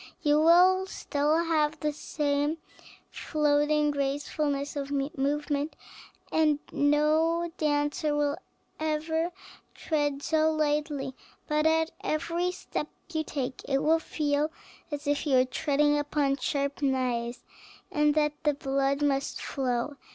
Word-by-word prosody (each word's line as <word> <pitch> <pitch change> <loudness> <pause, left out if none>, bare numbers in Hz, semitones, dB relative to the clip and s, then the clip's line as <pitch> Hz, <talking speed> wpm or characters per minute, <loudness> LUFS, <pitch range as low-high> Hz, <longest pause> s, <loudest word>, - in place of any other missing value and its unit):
You 295 -1 +4
will 365 +3 +5
still 300 0 0
have 310 -2 +1
the 300 0 -1
same 290 +1 -1 0.5
floating 295 0 +1
gracefulness 285 +1 -2
of 280 -1 -3
movement, 285 +1 -1 0.6
and 310 -2 +3
no 315 +4 +2
dancer 295 0 +1
will 295 +1 +1 0.4
ever 315 +2 -1 0.4
tread 290 -3 -1
so 315 0 +2
lightly; 295 -3 -1 0.3
but 305 0 +2
at 320 0 +2
every 335 +3 -1
step 300 -4 -4 0.3
you 315 -1 0
take 265 -4 -4
it 275 -1 0
will 320 +2 +4
feel 300 -1 0 0.4
as 295 -1 -5
if 290 +2 0
you 275 - +3
were 255 - +5
treading 295 +3 +1
upon 290 -1 0
sharp 280 0 -2
knives, 250 -3 -1 0.5
and 300 0 +2
that 300 -1 +2
the 295 -2 +2
blood 275 +1 0
must 275 -1 0
flow. 260 +1 -2
295 Hz, 120 wpm, -28 LUFS, 285-310 Hz, 0.6 s, will